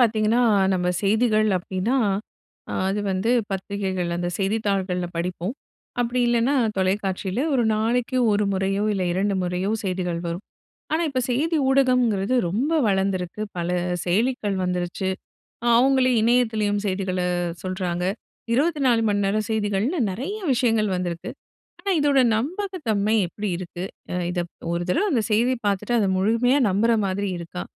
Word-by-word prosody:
பாத்தீங்கன்னா, 220 0 +3 0.3
நம்ம 180 -1 0
செய்திகள் 215 +1 +3
அப்பிடின்னா 185 +7 -1 0.7
அ - - -4 0.2
அது 200 +2 -1
வந்து 190 +4 0 0.2
பத்திரிகைகள், 190 -2 -2
அந்த 175 0 -2
செய்தித்தாள்கள்ல 195 -3 -1
படிப்போம். 180 +3 -2 0.5
அப்பிடி 245 +1 0
இல்லனா 240 +3 +2 0.2
தொலைக்காட்சியில 190 +3 -1
1 250 - +3
நாளக்கி 235 +3 0
1 205 0 +2
முறையோ, 195 +1 0
இல்ல 195 -2 -1
2 195 +3 0
முறையோ 180 +2 -1
செய்திகள் 180 -2 -2
வரும். 170 +3 -4 0.5
ஆனா 320 +2 +2
இப்ப 255 - 0
செய்தி 315 +7 +1
ஊடகம்ங்கிறது 250 -5 +2
ரொம்ப 245 - 0
வளந்திருக்கு. 190 -1 -1 0.2
பல 170 0 -2 0.4
செயலிகள் 205 +1 0
வந்துருச்சு. 180 +1 -2 0.7
அவுங்களே 260 0 +4
இணையத்திலயும் 220 -3 +2
செய்திகள 185 -1 -1 0.4
சொல்றாங்க. 185 -2 -2 0.5
24 270 -4 +2
மணி 205 0 +1
நேர 200 +2 +1
செய்திகள்னு 220 - 0
நெறைய 280 - -4
விஷயங்கள் 225 -4 +2
வந்திருக்கு. 175 -2 -4 0.5
ஆனா 395 - -1
இதோட 285 -2 +3 0.2
நம்பகத்தன்மை 260 - -1
எப்பிடி 205 +4 -4
இருக்கு, 180 0 -6 0.3
அ - - -1 0.2
இதப் 175 -1 -3 0.2
1 170 0 -1
தடவ 390 - +2
அந்த 230 -4 +2
செய்தி 240 +4 +3
பாத்துட்டு 205 +4 0
அத 200 -3 +2
முழுமையா 230 +7 +3
நம்புற 210 +5 +2 0.2
மாதிரி 195 +1 -2
இருக்கா? 170 +1 -6
205 Hz, 130 wpm, -23 LUFS, 185-240 Hz, 0.7 s, அவுங்களே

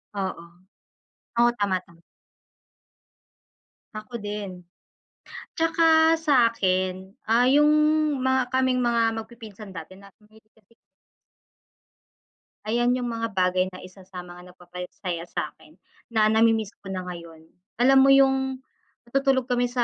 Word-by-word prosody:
Oo, 190 -3 -4 1.0
oo 240 0 +5
tama, 200 -2 +1
tama. 170 -1 -21 2.0
Ako 220 +1 -8
din. 205 -3 -6 0.9
Tsaka 325 0 +4
sa 285 -7 +3
akin, 185 -3 -1 0.2
ah, 230 +2 +4
yung 295 +2 +5 0.5
mga 260 -1 +1
kaming 260 -1 +1
mga 235 -1 +1 0.2
magpipinsan 220 -3 -11
dati 185 +3 -10
na 200 - -15
mahilig 215 +1 -24
kasi 215 -1 -31 2.0
Ayan 240 +2 +1
yung 250 -1 -1
mga 230 -1 -3
bagay 185 -1 +1
na 185 - -11
isa 185 +1 -13
sa 185 -1 -10
mga 180 0 -11
nagpapasaya 180 -1 -7
sa'kin, - - -7 0.3
na 215 -1 +3
nami-miss 220 -1 +2
ko 195 - -7
na 185 -1 -5
ngayon. 165 -2 -10 0.3
Alam 265 +2 +5
mo 275 - +5
yung 265 -1 +3 0.5
matutulog 270 0 +1
kami 245 -1 0
sa 245 -1 0
220 Hz, 120 wpm, -24 LUFS, 185-250 Hz, 2.0 s, oo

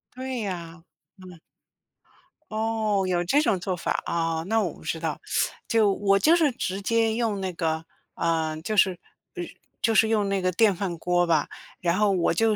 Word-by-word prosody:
对 255 -3 -4
啊， 170 -3 -6 0.3
嗯。 180 -2 -13 1.1
哦， 215 -2 0
有 175 -1 +1
这 280 +12 +3
种 215 -11 +1
做 180 +1 -2
法， 170 - -2
啊， 165 -1 -1
那 225 +1 +2
我 175 -6 -2
不 - - -16
知 160 - -3
道。 160 -2 -3 0.5
就 220 -3 +3
我 195 0 +2
就 315 - +5
是 320 -5 +3
直 195 -5 -3
接 225 +1 +2
用 220 -4 -1
那 190 -1 -2
个， 160 -2 -2 0.3
呃， 160 -2 0
就 215 +5 -3
是 190 - +5 0.4
呃， 175 - -3 0.4
就 225 - +2
是 220 - +5
用 210 -2 +1
那 195 -1 0
个 185 - +1
电 210 +1 +4
饭 180 -2 -3
锅 175 +1 +1
吧， 170 - +2 0.3
然 175 0 +1
后 210 -1 +4
我 180 -3 +2
就 220 +4 +2
195 Hz, 195 characters per minute, -25 LUFS, 170-220 Hz, 1.1 s, 就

